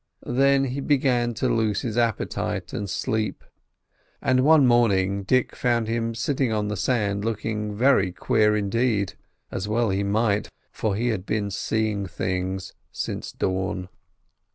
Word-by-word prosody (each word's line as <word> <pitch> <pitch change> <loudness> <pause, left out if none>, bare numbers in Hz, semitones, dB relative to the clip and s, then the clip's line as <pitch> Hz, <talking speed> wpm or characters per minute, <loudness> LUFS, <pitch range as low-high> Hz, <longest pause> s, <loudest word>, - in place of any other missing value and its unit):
Then 135 +2 +3
he 135 +1 -2
began 125 -5 +1
to 130 - 0
lose 110 -4 +1
his 115 -3 -3
appetite 115 -3 -1
and 100 - -3
sleep; 110 +4 -2 0.8
and 130 0 +2
one 155 -1 +6
morning 100 -5 +3
Dick 130 +6 +1
found 120 -2 +1
him 115 0 -1
sitting 130 +1 0
on 105 -1 -1
the 105 - -2
sand 100 -2 0
looking 105 -1 -2
very 115 -5 +3
queer 105 +4 +2
indeed—as 105 -2 -2
well 110 0 +1
he 95 +1 0
might, 105 +1 +1 0.2
for 105 -3 -1
he 120 +4 0
had 105 -4 -3
been 105 -2 -1
"seeing 105 +1 -1
things" 95 0 -3 0.2
since - - -4
dawn. 95 -1 -2
110 Hz, 140 wpm, -24 LUFS, 100-120 Hz, 0.8 s, one